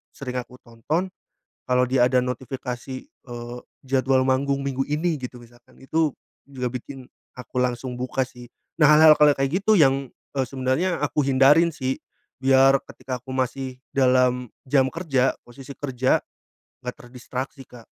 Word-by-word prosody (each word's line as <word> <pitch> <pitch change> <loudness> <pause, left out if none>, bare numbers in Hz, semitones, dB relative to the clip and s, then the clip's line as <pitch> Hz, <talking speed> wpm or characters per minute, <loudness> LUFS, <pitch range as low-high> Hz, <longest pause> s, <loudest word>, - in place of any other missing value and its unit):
sering 125 -2 -4
aku 125 0 -9
tonton, 150 +11 -3 0.6
kalau 125 0 +3
dia 125 0 +2
ada 130 0 +3
notifikasi, 125 0 -5
eee, 120 -1 -9 0.3
jadwal 130 0 +2
manggung 140 +1 +1
Minggu 135 -1 -1
ini 160 +4 0
gitu 125 -1 -7
misalkan 120 0 -19
itu 155 +4 0 0.4
juga 125 -2 -4
bikin 130 +1 -7 0.3
aku 125 +1 -3
langsung 125 0 -2
buka 130 +1 -2
sih. 125 -1 -14 0.3
Nah 150 - +7
hal-hal 155 0 +9
kalau 150 -2 +4
kayak 135 +8 0
gitu 215 0 +4
yang, 135 -4 +3 0.2
eee, 135 -2 0
sebenarnya 135 +7 0
aku 150 +2 0
hindarin 140 +5 +5
sih. 130 -4 -3 0.4
Biar 135 +1 +5
ketika 130 -2 -7
aku 130 - -15
masih 130 0 -3 0.2
dalam 125 -2 +3 0.2
jam 130 -1 +3
kerja, 135 -5 0
posisi 135 +3 -11
kerja, 130 -2 +1 0.7
gak 125 - -3
terdistraksi, 130 +2 -7
Kak. 120 -2 -14
130 Hz, 145 wpm, -24 LUFS, 125-140 Hz, 0.7 s, hal-hal